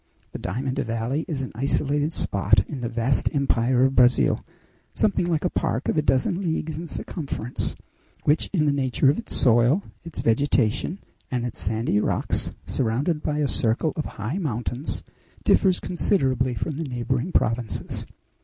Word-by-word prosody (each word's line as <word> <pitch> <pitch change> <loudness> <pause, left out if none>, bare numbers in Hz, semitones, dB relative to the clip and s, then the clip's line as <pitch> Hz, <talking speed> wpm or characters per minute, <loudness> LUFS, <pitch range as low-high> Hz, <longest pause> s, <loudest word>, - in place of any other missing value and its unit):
The - - -6
diamond 130 +7 -2
valley 115 +7 -1
is 140 -4 -2
an 130 - -5
isolated 145 +5 +1
spot 95 - +2
in 135 -4 -6
the 120 - -2
vast 120 +3 +1
empire 130 -2 +2
of 135 0 +2
Brazil, 125 0 +4 0.5
something 190 -4 +1
like 165 -1 0
a - - +3
park 115 +5 -1
of - - +1
a 155 - +3
dozen 150 +6 +1
leagues 160 -3 -2
in 170 +2 -5
circumference, 140 - -4 0.5
which 150 +2 +2
in 160 -6 +2
the 145 - +3
nature 135 -1 +2
of 150 - -3
its 230 - -2
soil, 120 - +4 0.2
its 165 -1 -6
vegetation, 125 - +1 0.3
and 125 -2 -1
its 120 - -4
sandy 110 +2 +1
rocks - - 0
surrounded 135 +7 0
by 150 -1 -1
a 150 -1 +1
circle 120 +6 +1
of 155 - -2
high 120 - -2
mountains, 125 - -3 0.4
differs 185 -2 +4
considerably 130 - +1
from 145 +4 -3
the 165 - -2
neighboring 125 +6 -1
provinces. 115 - -1
135 Hz, 160 wpm, -24 LUFS, 120-155 Hz, 0.5 s, Brazil